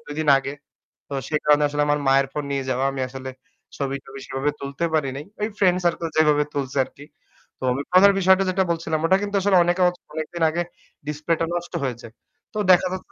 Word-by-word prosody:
২ 145 - -6
দিন 155 - -2
আগে। 135 0 -5 0.6
তো - - -6
সেই 150 -1 0
কারণে 150 0 +5
আসলে 145 0 -2
আমার 145 0 +2
মায়ের 135 0 +4
phone 150 -1 -3
নিয়ে 140 -1 -1
যাওয়া 130 +1 0
আমি 135 -1 -4
আসলে 130 0 -7 0.5
ছবি-টবি 135 -1 -5
সেভাবে 135 +2 -1
তুলতে 140 +4 -3
পারি 145 -4 +1
নাই। 145 - -5 0.2
ওই 210 - +1
friend 180 -2 +3
circle 170 -1 0
যেভাবে 150 -1 +4
তুলছে 140 -1 -3
আর 130 - -11
কি। 145 - -11 0.5
তো - - -10
আমি 140 - -2
phone 185 +2 +6
এর 200 - +4
বিষয়টা 190 +1 +4
যেটা 190 +1 +2
বলছিলাম 165 -1 -1
ওটা 190 +3 +4
কিন্তু 205 0 -3
আসলে 200 0 +3
অনেকে 175 +2 0 0.3
অনেকদিন 160 +2 -3
আগে 170 +2 -1 0.4
display 150 +2 -1
টা 165 - +3
নষ্ট 175 0 -5
হয়ে 125 -3 -1
যায়। 115 - -12 0.4
তো 215 - -6
দেখা 180 +1 +5
যাচ্ছে 185 - -8
150 Hz, 215 wpm, -23 LUFS, 140-175 Hz, 0.6 s, phone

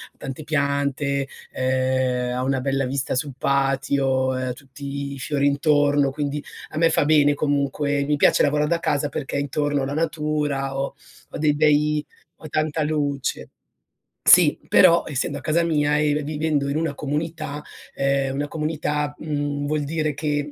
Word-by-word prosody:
tante 135 +3 -7
piante, 140 -2 0 0.2
ehm, 130 -1 0
ha 125 - -1
una 135 0 0
bella 135 0 0
vista 135 +1 -2
sul 135 +2 -2
patio, 135 -1 +1
ehm, 130 -1 -2
tutti 140 +1 -7
i - - -8
fiori 140 +1 0
intorno, 145 -1 +3
quindi 145 +1 -3 0.3
a - - -8
me 165 +1 +4
fa - - +3
bene 145 -1 +4
comunque. 145 0 0
Mi 150 +1 +1
piace 145 - +4
lavorar 150 +1 +2
da 170 +1 +1
casa 145 -3 0
perché 140 -1 -4
intorno 145 0 -1
ho - - -1
la 140 - -4
natura 150 -4 -1
ho 135 0 -3 0.3
ho - - -7
dei 150 -1 +2
bei 150 0 +2 0.3
ho 155 - -10
tanta 155 +1 0
luce. 145 -3 -2 0.7
Sì, - - +7
però, 170 0 +6
essendo 140 -4 -2
a - - -13
casa 165 +2 +1
mia 150 -3 +2
e 150 -1 +2
v 150 - 0
vivendo 150 -1 -1
in 140 - -1
una 160 -2 -1
comunità 150 +1 -4 0.3
ehm, 135 -1 0
una 145 +1 -2
comunità 150 -1 -2
mhmm, 145 -2 -3
vuol 150 0 -1
dire 155 +1 -1
che 145 0 -2
145 Hz, 165 wpm, -23 LUFS, 140-150 Hz, 0.7 s, Sì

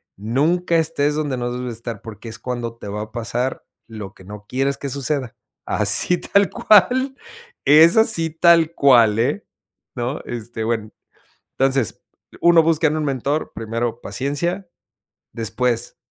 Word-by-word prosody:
nunca 155 - 0
estés 150 -2 0
donde 150 -3 -2
no 120 -1 -3
debes 125 -1 -4
estar, 115 -2 -7
porque, 115 +1 -10
es - - -8
cuando 120 -2 -5
te 105 - -10
va 105 +1 -4
a 110 0 -8
pasar 120 +2 -3 0.2
lo 105 -3 -9
que 95 - -17
no 105 +1 -11
quieres 135 +2 -1
que 140 - -5
suceda. 135 -2 -3 0.3
Así 110 - +3
tal 200 -3 +2
cual, 260 - +3 0.5
es 160 +6 +7
así 215 -8 +4
tal 165 0 +4
cual 120 -8 +4
eh, 140 - -1 0.5
¿no? 125 +3 -3
Este, 115 -1 -6
bueno, 110 -2 -2 0.7
entonces 135 -3 0 0.4
uno 170 -1 +6
busca 160 0 +2
en 155 - -2
un 155 - -2
mentor, 140 +3 -2
primero 115 +1 -3
paciencia, 170 +8 -3 0.7
después 120 +1 -2
130 Hz, 145 wpm, -20 LUFS, 115-160 Hz, 0.7 s, es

